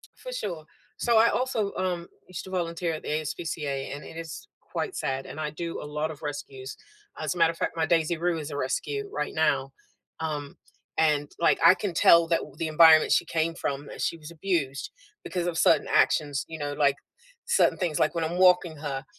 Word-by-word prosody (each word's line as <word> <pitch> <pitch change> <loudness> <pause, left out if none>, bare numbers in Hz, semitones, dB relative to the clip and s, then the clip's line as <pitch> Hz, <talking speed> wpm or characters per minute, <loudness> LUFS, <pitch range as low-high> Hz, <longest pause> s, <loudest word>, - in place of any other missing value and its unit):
For - - -9
sure. 175 - -4 0.3
So, 235 -1 +2
I 230 - +6
also, 235 -6 -1
um, 175 -2 -2 0.2
used 185 -2 -7
to 190 - -10
volunteer 170 -2 -2
at 155 - -5
the - - -7
ASPCA, 150 -3 -3
and 145 - -8
it 165 - -11
is 165 -1 -8
quite 390 - -4
sad, 135 0 -2
and - - -9
I 155 -1 -2
do 165 +2 -5
a - - -7
lot 150 +1 -3
of 155 -1 -10
rescues. 140 -3 -6 0.4
As - - -1
a - - -7
matter 165 -1 +4
of 165 - -15
fact, - - -2
my 160 -1 +1
Daisy 165 0 +2
Rue 170 0 0
is 150 -1 -6
a 145 - -5
rescue 420 - -2
right - - -2
now, - - +1 0.5
um, 150 -3 -4 0.4
and, 150 -2 +2
like, 170 - +3
I 185 - +9
can 195 -4 -4
tell 170 0 +6
that 165 - +2 0.2
the 165 - -2
environment 155 0 +6
she - - +4
came 165 0 -1
from, 140 -3 -3
that - - -7
she - - 0
was 160 0 -11
abused 160 -6 -2 0.3
because 175 -2 -3
of 175 -2 -2
certain - - +4
actions, 145 -2 +2
you 160 - -7
know? 145 -1 -3
Like 145 -1 +2 0.5
certain 475 - +3
things 175 -5 -1
like 155 - +2
when 165 - 0
I'm 170 +2 -3
walking 180 -3 +4
her, 140 -2 -4
160 Hz, 210 wpm, -27 LUFS, 150-175 Hz, 0.5 s, I